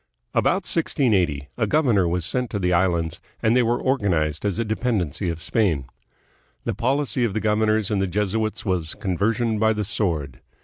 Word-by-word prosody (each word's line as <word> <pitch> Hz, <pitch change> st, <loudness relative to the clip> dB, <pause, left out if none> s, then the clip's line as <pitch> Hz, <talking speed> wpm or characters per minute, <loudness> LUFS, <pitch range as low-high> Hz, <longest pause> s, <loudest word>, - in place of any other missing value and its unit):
About 190 Hz, +2 st, +2 dB
1680 95 Hz, -, +1 dB
a 110 Hz, -3 st, +1 dB
governor 115 Hz, -, +3 dB
was 85 Hz, 0 st, -1 dB
sent 125 Hz, -2 st, -1 dB
to -, -, -3 dB
the 90 Hz, -2 st, +1 dB
islands, 85 Hz, -2 st, +1 dB, 0.2 s
and 110 Hz, +2 st, +3 dB
they 125 Hz, -, +5 dB
were 120 Hz, +1 st, +1 dB
or 135 Hz, +1 st, +1 dB
ganized 80 Hz, -5 st, 0 dB
as 100 Hz, -2 st, 0 dB
a 115 Hz, -, 0 dB
dependency 105 Hz, -, -1 dB
of 80 Hz, -1 st, -5 dB
Spain. 90 Hz, -, +1 dB, 0.8 s
The -, -, -1 dB
policy 135 Hz, 0 st, 0 dB
of 110 Hz, -5 st, 0 dB
the -, -, +1 dB
governors 110 Hz, -1 st, +1 dB
and 100 Hz, -2 st, +1 dB
the 95 Hz, -, +1 dB
Jesuits 105 Hz, +3 st, -1 dB
was 90 Hz, -5 st, -1 dB
conversion 110 Hz, +4 st, 0 dB
by 110 Hz, 0 st, +3 dB
the 105 Hz, 0 st, -2 dB
sword. 85 Hz, -, -2 dB
105 Hz, 180 wpm, -23 LUFS, 90-115 Hz, 0.8 s, they